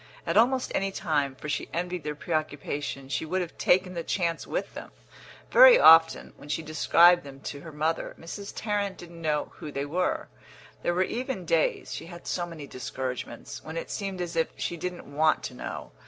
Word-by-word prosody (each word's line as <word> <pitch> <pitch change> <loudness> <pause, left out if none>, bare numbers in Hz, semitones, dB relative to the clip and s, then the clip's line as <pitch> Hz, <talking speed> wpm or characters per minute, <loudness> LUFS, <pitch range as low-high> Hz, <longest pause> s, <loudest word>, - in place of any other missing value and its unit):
At 170 - -1
almost 250 +4 +3
any 195 0 0
time, 145 -7 -1
for 150 - -8
she 150 - -2
envied 175 0 -3
their 150 0 -3
preoccupation, 145 -3 -3
she 140 - -2
would 180 +4 -1
have 175 -1 -6
taken 185 0 +3
the 170 - -3
chance 170 -1 -1
with - - -3
them. - - -8 0.6
Very - - +9
often, 165 0 +6
when 145 - -13
she 160 - -1
described 170 +3 +5
them 135 -1 -11
to 140 - -6
her 165 - -9
mother, 155 +2 -2
Mrs. 200 +5 -7
Tarrant 205 -3 -2
didn't 170 -1 -11
know 150 -2 -1
who 155 -4 -7
they 140 0 -3
were; 175 +5 -1 0.5
there 175 - 0
were 185 - +3
even 235 -3 -3
days 160 -1 +1
(she - - -6
had 175 0 -11
so 175 -1 -2
many 160 -4 -8
discouragements) 130 -1 -6
when 160 +1 -7
it - - -5
seemed 195 -3 -3
as 175 -1 -4
if 165 -1 +2
she 175 - -2
didn't 180 +2 -5
want 155 +1 +3
to - - -5
know. - - -7
165 Hz, 195 wpm, -27 LUFS, 150-180 Hz, 0.6 s, Very